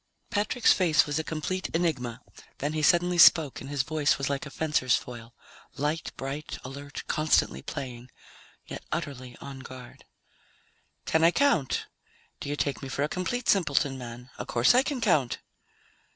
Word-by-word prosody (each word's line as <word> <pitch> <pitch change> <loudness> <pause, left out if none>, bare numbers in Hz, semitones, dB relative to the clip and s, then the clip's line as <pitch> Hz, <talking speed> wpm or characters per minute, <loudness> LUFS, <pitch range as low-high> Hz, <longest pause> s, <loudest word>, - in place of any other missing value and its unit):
Patrick's 215 +3 +3
face 170 -5 +3
was 145 +1 -1
a - - -1
complete 165 +5 -3
enigma. 135 -9 -1 0.4
Then 145 +2 -2
he 155 - -1
suddenly 175 +3 +3
spoke, 160 -4 +6
and 135 - -8
his 140 -2 0
voice 150 0 +1
was 135 +1 -2
like 140 +1 -3
a - - -8
fencer's 145 -5 +1
foil 120 -1 -7 0.4
light, 150 +2 -2
bright, 140 +3 -5
alert, 140 +2 -7
constantly 155 - +1
playing, 125 - -7 0.6
yet - - -8
utterly 130 -3 -5
on 140 -1 -8
guard. 130 -1 -11 1.0
"Can 160 0 +2
I 165 - +8
count? 180 - +2 0.5
Do - - -5
you 145 - -1
take 140 -2 -2
me 135 - -6
for 140 +1 -1
a - - +1
complete 225 +9 -3
simpleton, 145 -7 +2
man? 125 0 -9
Of - - -5
course 120 - +4
I 250 - +6
can 275 -2 -3
count!" 155 - +2
145 Hz, 165 wpm, -28 LUFS, 130-165 Hz, 1.0 s, I